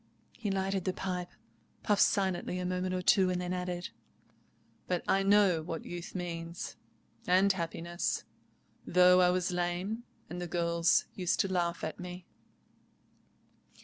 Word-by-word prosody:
He 210 - -3
lighted 195 -1 -1
the 185 - 0
pipe, 180 -1 -3 0.5
puffed 205 -3 +3
silently 190 -2 +1
a 180 - -3
moment 185 0 -1
or 180 - -2
two, 190 -1 +5
and 180 -1 0
then 180 0 -2
added: 180 -1 -3 1.0
"But 180 -1 -1
I 195 - +3
know 195 -4 +4
what 165 0 -5
youth 175 +1 -7
means, 170 -1 -5 0.5
and 190 +2 +5
happiness, 170 -1 -2 0.6
though 180 0 +6
I 180 - +5
was 180 0 0
lame, 180 +6 -2 0.2
and 175 +1 -6
the 175 - -3
girls 170 0 +2
used 180 -2 0
to 190 -1 -2
laugh 170 -1 0
at 160 - -4
me." 180 0 -7
180 Hz, 145 wpm, -31 LUFS, 175-185 Hz, 1.0 s, though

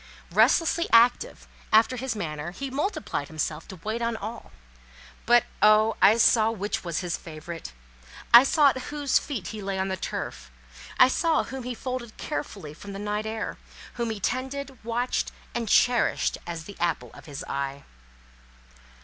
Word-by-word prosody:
Restlessly 335 0 +3
active, 245 - +4 0.2
after 225 +4 +5
his 255 -2 -3
manner, 155 -5 -4
he 270 +9 -6
multiplied 290 - -2
himself 155 0 -4
to 190 - -9
wait 220 +2 -2
on 230 -1 -1
all; 220 +3 -7 0.8
but 240 0 +6 0.2
oh! 215 +1 +5
I 220 - +7
saw 225 -1 +5
which 220 0 -3
was 170 -1 -2
his 175 -2 -2
favourite. 165 +1 -8 0.6
I 235 +2 +11
saw 290 +1 +5
at 260 -1 -3
whose 290 -2 +1
feet 225 - -5
he 215 -1 -6
lay 195 -1 -3
on 190 0 -1
the 190 - -1
turf, - - -5 0.5
I 255 - +8
saw 325 +5 +1
whom 265 0 -7
he 250 -1 -4
folded 250 -2 -5
carefully 200 - -5
from 200 +5 -10
the - - -6
night 210 +1 -3
air, 220 0 -4 0.3
whom 235 -1 -2
he 220 -2 -4
tended, 265 +4 -3
watched, 235 +2 -1 0.2
and 230 -3 -3
cherished 245 +2 +3
as 165 -2 -5
the 200 +4 -11
apple 170 -1 -1
of - - -13
his 145 +3 -6
eye. 140 -1 -4
220 Hz, 165 wpm, -26 LUFS, 185-255 Hz, 0.8 s, I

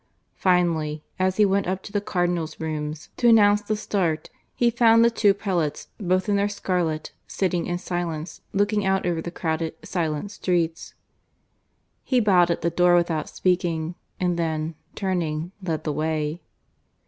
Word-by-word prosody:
Finally, 165 -5 +1 0.2
as 185 0 +1
he 210 - +6
went 195 -1 +1
up 185 +1 -2
to - - -9
the 205 - 0
Cardinals' 175 -5 -1
rooms 155 -1 -4
to 240 - +3
announce 210 -2 +6
the 215 +1 -1
start, 175 -7 -1 0.2
he 240 -1 +3
found 230 -1 +5
the 235 - +4
two 210 -3 +4
prelates, 185 -7 -2
both 185 -1 +1
in 205 -1 +2
their 200 +1 +1
scarlet, 175 -6 -2 0.2
sitting 180 -3 -1
in 175 - -1
silence, 175 -3 -4
looking 205 +1 +1
out 190 0 +1
over 170 -2 0
the 170 - -5
crowded 160 -2 -2
silent 165 +2 -2
streets. 170 -5 -1 1.1
He 255 - +2
bowed 185 -6 +4
at 170 - 0
the 170 - 0
door 175 +1 +4
without 170 -3 +1
speaking, 175 -3 0 0.3
and 180 -1 0
then, 160 -1 -1 0.2
turning, 175 -4 -2
led 165 -4 -2
the 150 - -1
way. 155 +1 -2
175 Hz, 160 wpm, -24 LUFS, 160-200 Hz, 1.1 s, he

